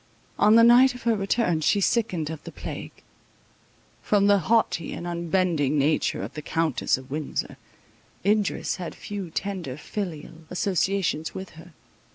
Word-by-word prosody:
On 210 Hz, +2 st, +6 dB
the 230 Hz, -, +7 dB
night 245 Hz, +2 st, +6 dB
of 245 Hz, -, -10 dB
her 230 Hz, -1 st, +2 dB
return 195 Hz, -4 st, 0 dB
she 200 Hz, -, +3 dB
sickened 185 Hz, -7 st, 0 dB
of 160 Hz, -2 st, -8 dB
the -, -, -8 dB
plague. -, -, -8 dB, 1.0 s
From 205 Hz, -1 st, +2 dB
the 205 Hz, 0 st, +5 dB
haughty 190 Hz, -3 st, +1 dB
and 175 Hz, -, -6 dB
unbending 170 Hz, -4 st, 0 dB
nature 145 Hz, +2 st, +1 dB
of -, -, -7 dB
the 155 Hz, -, -6 dB
Countess 160 Hz, -4 st, 0 dB
of 130 Hz, 0 st, -13 dB
Windsor, 150 Hz, 0 st, -3 dB, 0.7 s
Idris 210 Hz, -1 st, +1 dB
had 180 Hz, -3 st, -6 dB
few 200 Hz, -4 st, -6 dB
tender 175 Hz, -7 st, -4 dB
filial 165 Hz, -2 st, -6 dB
associations 180 Hz, -3 st, -1 dB
with 190 Hz, 0 st, -7 dB
her. 165 Hz, +2 st, -14 dB
180 Hz, 150 wpm, -25 LUFS, 160-205 Hz, 1.0 s, the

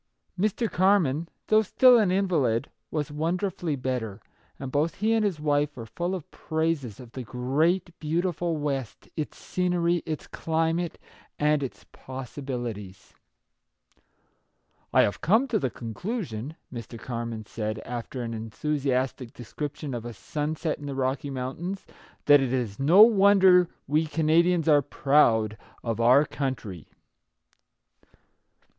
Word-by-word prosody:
Mr. 215 Hz, +5 st, 0 dB
Carman, 170 Hz, -6 st, +2 dB, 0.2 s
though 215 Hz, 0 st, +4 dB
still 245 Hz, +3 st, +6 dB
an 210 Hz, -4 st, +3 dB
invalid, 160 Hz, -, +1 dB, 0.2 s
was 150 Hz, -2 st, -3 dB
wonderfully 170 Hz, +1 st, -1 dB
better, 125 Hz, -6 st, -3 dB, 0.4 s
and 135 Hz, -1 st, -6 dB
both 150 Hz, +3 st, 0 dB
he 220 Hz, +3 st, +1 dB
and 225 Hz, -1 st, +2 dB
his 195 Hz, -7 st, -1 dB
wife 145 Hz, -1 st, 0 dB
were 115 Hz, -, -6 dB
full 175 Hz, +10 st, -3 dB
of 175 Hz, -5 st, -8 dB
praises 160 Hz, -8 st, -2 dB
of 125 Hz, -3 st, -11 dB
the 130 Hz, -, -6 dB
great, 140 Hz, -, 0 dB
beautiful 170 Hz, +1 st, -1 dB
West, 140 Hz, -6 st, -4 dB
its 155 Hz, -, -4 dB
scenery, 175 Hz, -1 st, 0 dB
its 155 Hz, -2 st, -4 dB
climate, 165 Hz, +1 st, -1 dB, 0.4 s
and 150 Hz, 0 st, +2 dB
its 135 Hz, -, -6 dB
possi 130 Hz, +1 st, -8 dB
bilities. 110 Hz, -8 st, -6 dB, 0.9 s
" -, -, -43 dB
I -, -, +5 dB
have 100 Hz, -, -1 dB
come 220 Hz, -, +3 dB
to 220 Hz, -2 st, +1 dB
the 130 Hz, -, -1 dB
conclusion," 135 Hz, -, -5 dB, 0.2 s
Mr. 115 Hz, -1 st, -7 dB
Carman 115 Hz, -2 st, -5 dB
said, 110 Hz, 0 st, -4 dB
after 120 Hz, +2 st, -5 dB
an 115 Hz, -1 st, -4 dB
enthusiastic 130 Hz, +2 st, -2 dB
description 145 Hz, +4 st, -6 dB
of 120 Hz, -2 st, -4 dB
a 120 Hz, 0 st, -6 dB
sunset 155 Hz, -, -3 dB
in 145 Hz, -, -7 dB
the 140 Hz, -, -4 dB
Rocky 135 Hz, +2 st, -1 dB
Mountains, 140 Hz, +9 st, -4 dB, 0.2 s
" -, -, -28 dB
that 145 Hz, -1 st, +7 dB
it 130 Hz, -2 st, -1 dB
is 120 Hz, -6 st, -2 dB
no 170 Hz, +10 st, +8 dB
wonder 195 Hz, -5 st, +6 dB, 0.2 s
we 155 Hz, +3 st, +1 dB
Canadians 165 Hz, +2 st, +2 dB
are 145 Hz, -2 st, +6 dB
proud 115 Hz, -7 st, +2 dB, 0.3 s
of 115 Hz, -1 st, -2 dB
our 130 Hz, +5 st, +6 dB
country." 120 Hz, -, -4 dB
145 Hz, 140 wpm, -26 LUFS, 125-170 Hz, 0.9 s, no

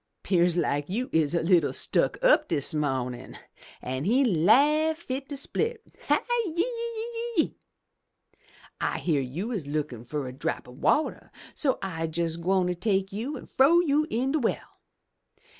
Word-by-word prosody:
'Pears 175 Hz, -2 st, +2 dB
like 145 Hz, -3 st, 0 dB
you 240 Hz, +7 st, -3 dB
is 160 Hz, 0 st, +2 dB
a 170 Hz, -, +1 dB
little 170 Hz, -4 st, +3 dB
stuck -, -, +1 dB
up -, -, +5 dB
dis 140 Hz, -, +2 dB
mawnin'!' 130 Hz, -5 st, -3 dB, 0.5 s
An' 130 Hz, +2 st, -3 dB
he 255 Hz, +7 st, +3 dB
laugh 285 Hz, -, +4 dB
fit 270 Hz, -4 st, -5 dB
to 285 Hz, -, -5 dB
split, 450 Hz, -, -3 dB
*Hi, -, -, +4 dB, 0.3 s
yi, 340 Hz, -, -4 dB
yi, 465 Hz, 0 st, -4 dB
yi! -, -, -8 dB, 1.3 s
I -, -, 0 dB
hear 150 Hz, -5 st, 0 dB
you 165 Hz, -, -4 dB
is 190 Hz, -, -4 dB
lookin' 145 Hz, -6 st, -3 dB
fur 135 Hz, +2 st, -4 dB
a 125 Hz, -, -7 dB
drop 130 Hz, -1 st, -3 dB
o' 125 Hz, -, -12 dB
wateh, 300 Hz, -, 0 dB, 0.2 s
so 275 Hz, -4 st, 0 dB
I'se 165 Hz, -3 st, -4 dB
jes' 165 Hz, -1 st, 0 dB
gwine 180 Hz, +1 st, +1 dB
take 195 Hz, 0 st, 0 dB
you 250 Hz, +8 st, -4 dB
an' -, -, -10 dB
frow 295 Hz, +6 st, +4 dB
you 305 Hz, -2 st, +2 dB
in 255 Hz, +4 st, 0 dB
de 310 Hz, -, +1 dB
well!' 235 Hz, -, -2 dB
195 Hz, 160 wpm, -27 LUFS, -, 1.3 s, up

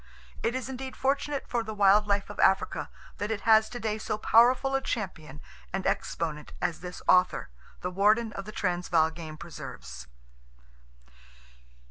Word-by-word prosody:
It 235 Hz, +2 st, 0 dB
is 260 Hz, -1 st, -3 dB
indeed 265 Hz, 0 st, -6 dB
fortunate 275 Hz, +1 st, 0 dB
for 240 Hz, -, 0 dB
the 220 Hz, -1 st, -6 dB
wild 205 Hz, +1 st, +5 dB
life 200 Hz, -1 st, 0 dB
of -, -, -11 dB
Africa 190 Hz, -, +2 dB, 0.3 s
that 205 Hz, -, -2 dB
it 220 Hz, -2 st, -2 dB
has 220 Hz, 0 st, +5 dB
today 220 Hz, -3 st, -3 dB
so 215 Hz, -, -2 dB
powerful 245 Hz, +5 st, +4 dB
a 270 Hz, -, +2 dB
champion 165 Hz, -, -5 dB, 0.3 s
and 190 Hz, 0 st, -3 dB
exponent 150 Hz, -3 st, -2 dB
as 175 Hz, -2 st, -1 dB
this 180 Hz, 0 st, -8 dB
author, 180 Hz, -, +3 dB, 0.3 s
the 180 Hz, -, -3 dB
warden 210 Hz, +4 st, +3 dB
of 195 Hz, -, -6 dB
the 215 Hz, -, -7 dB
Transvaal 175 Hz, -5 st, +1 dB
Game 160 Hz, -1 st, -8 dB
Preserves. 65 Hz, -, -9 dB
205 Hz, 150 wpm, -28 LUFS, 175-230 Hz, 0.3 s, wild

